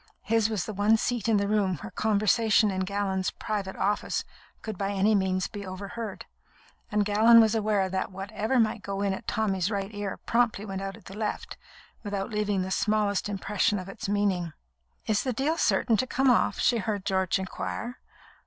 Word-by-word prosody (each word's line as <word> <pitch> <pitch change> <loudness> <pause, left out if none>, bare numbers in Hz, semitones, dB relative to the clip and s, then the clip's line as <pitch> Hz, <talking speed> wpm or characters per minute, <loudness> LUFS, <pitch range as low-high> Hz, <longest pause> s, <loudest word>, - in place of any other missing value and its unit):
His 225 0 +2
was 210 -5 -2
the 215 - -5
one 205 +3 +3
seat 230 -1 -1
in 220 - +4
the 200 0 0
room 200 -4 +1
where 105 -6 -9
conversation 215 0 +3
in 190 0 -1
Gallon's 195 -1 -1
private 200 -3 -4
office 205 +2 0 0.4
could 220 -2 -4
by 195 +1 -2
any 200 +2 +2
means 190 -2 +1
be 205 -1 -7
overheard; 200 +3 -6 0.7
and 210 -1 +2
Gallon 220 +3 +6
was 220 -1 +5
aware 210 -3 +1
that 190 +1 -2
whatever 210 +6 -1
might 220 -1 +1
go 200 0 -3
in 200 -1 +1
at - - -7
Tommy's 195 -4 0
right 200 0 -3
ear 205 -2 -4
promptly 230 -3 +1
went 195 -2 -5
out 195 -1 -5
at - - -19
the 195 - -10
left, 215 0 -3 0.5
without 205 0 -4
leaving 205 -3 0
the 190 - -5
smallest 210 0 +1
impression 205 +1 0
of 185 -1 -6
its 195 - -6
meaning. 195 -5 0 0.5
"Is 215 -1 +1
the 255 - -1
deal 280 +7 0
certain 235 -8 +2
to 255 - 0
come 265 0 +3
off?" 240 - +2
she 240 -2 +3
heard 205 -1 -3
George 190 -2 +1
inquire. 225 +5 -5
205 Hz, 190 wpm, -27 LUFS, 195-220 Hz, 0.7 s, Gallon